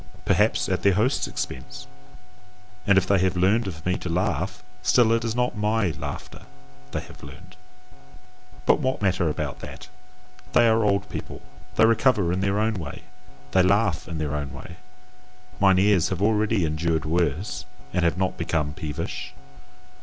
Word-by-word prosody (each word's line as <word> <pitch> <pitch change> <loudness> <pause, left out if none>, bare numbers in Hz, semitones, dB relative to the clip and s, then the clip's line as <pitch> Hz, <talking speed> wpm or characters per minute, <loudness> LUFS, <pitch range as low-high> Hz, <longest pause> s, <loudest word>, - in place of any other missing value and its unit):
perhaps - - +2
at - - -1
their 100 -2 +3
host's 120 +7 +1
expense; - - -6 1.0
and 100 -1 +5
if 95 - +4
they 100 0 +3
have 95 0 +1
learned 100 +5 +3
of 80 -4 -7
me 90 0 +1
to 90 - -5
laugh, 85 +2 -1 0.2
still 115 +4 +4
it 115 0 +2
is 115 -1 -2
not 125 0 0
MY 105 -2 +1
laughter 75 -2 -7 0.4
they - - -3
have - - -14
learned. 90 +7 -12 1.1
But - - +4
what 130 -6 -1
matter 95 -4 +2
about 75 - -4
that! - - -10 0.6
They 120 - +6
are 110 0 +3
old 100 -2 +1
people: - - -7 0.3
they 110 - +6
recover 110 -6 +3
in 90 - -1
their 100 +1 +1
own 110 -1 0
way, 75 -4 -7 0.5
they 95 - +4
laugh 95 -2 +2
in 85 - -5
their 75 -2 -2
own 70 -2 -3
way; 85 +6 -10 0.8
mine 95 -2 +5
ears 95 -3 +3
have 95 - -3
already 105 -3 +2
endured 80 0 -1
worse 85 +3 -1 0.3
and 90 - +1
have 85 0 +2
not 95 0 -1
become 80 -3 -1
peevish. 80 -3 -5
95 Hz, 165 wpm, -25 LUFS, 85-105 Hz, 1.1 s, They